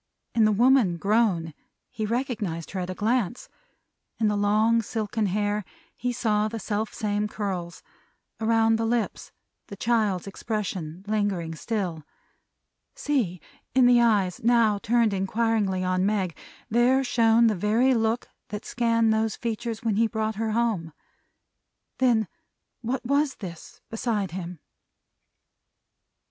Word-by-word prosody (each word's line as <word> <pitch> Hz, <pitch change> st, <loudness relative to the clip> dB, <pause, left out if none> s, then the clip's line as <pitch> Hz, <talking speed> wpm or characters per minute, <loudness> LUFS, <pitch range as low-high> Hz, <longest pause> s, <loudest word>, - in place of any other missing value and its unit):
In 225 Hz, -2 st, +4 dB
the 215 Hz, -, +4 dB
woman 230 Hz, -4 st, +4 dB
grown, 195 Hz, -5 st, +1 dB, 0.4 s
he 215 Hz, -1 st, -3 dB
recognized 215 Hz, -, -3 dB
her 195 Hz, -, -3 dB
at 180 Hz, 0 st, -4 dB
a 185 Hz, -, -4 dB
glance. 235 Hz, +2 st, -1 dB, 0.7 s
In 220 Hz, -2 st, +3 dB
the 210 Hz, -, 0 dB
long 215 Hz, +3 st, +3 dB
silken 220 Hz, -1 st, -2 dB
hair, 205 Hz, +2 st, 0 dB, 0.3 s
he 245 Hz, -, -2 dB
saw 215 Hz, -3 st, +1 dB
the 225 Hz, +1 st, -5 dB
self 215 Hz, 0 st, -2 dB
same 210 Hz, 0 st, -1 dB
curls; 190 Hz, -5 st, -4 dB, 0.6 s
around 225 Hz, 0 st, +3 dB
the 225 Hz, -, -1 dB
lips, 235 Hz, -1 st, -2 dB, 0.4 s
the 200 Hz, -, -8 dB
child's 210 Hz, -4 st, 0 dB
expression 190 Hz, -5 st, -4 dB
lingering 200 Hz, -6 st, -1 dB
still. 175 Hz, -3 st, -3 dB, 0.9 s
See! 260 Hz, -, -1 dB, 0.4 s
In 260 Hz, -1 st, +6 dB
the 245 Hz, -1 st, +6 dB
eyes, 205 Hz, -6 st, +2 dB
now 230 Hz, -3 st, +4 dB
turned 230 Hz, -1 st, +2 dB
inquiringly 195 Hz, -1 st, 0 dB
on 185 Hz, 0 st, +1 dB
Meg, 195 Hz, -4 st, 0 dB, 0.3 s
there 245 Hz, +4 st, +3 dB
shone 230 Hz, -2 st, +4 dB
the 225 Hz, -, +4 dB
very 220 Hz, +7 st, +2 dB
look 225 Hz, 0 st, 0 dB, 0.2 s
that 210 Hz, 0 st, -6 dB
scanned 230 Hz, -2 st, +2 dB
those 220 Hz, -1 st, 0 dB
features 230 Hz, -1 st, -4 dB
when 220 Hz, -3 st, 0 dB
he 225 Hz, +1 st, +4 dB
brought 220 Hz, -1 st, -2 dB
her 220 Hz, +1 st, -2 dB
home! 215 Hz, -9 st, 0 dB, 1.1 s
Then 235 Hz, -5 st, +3 dB, 0.5 s
what 250 Hz, +2 st, -3 dB
was 280 Hz, +2 st, +1 dB
this, 170 Hz, -5 st, -10 dB
beside 215 Hz, -5 st, -1 dB
him? 175 Hz, -3 st, -6 dB
215 Hz, 130 wpm, -26 LUFS, 195-230 Hz, 1.1 s, In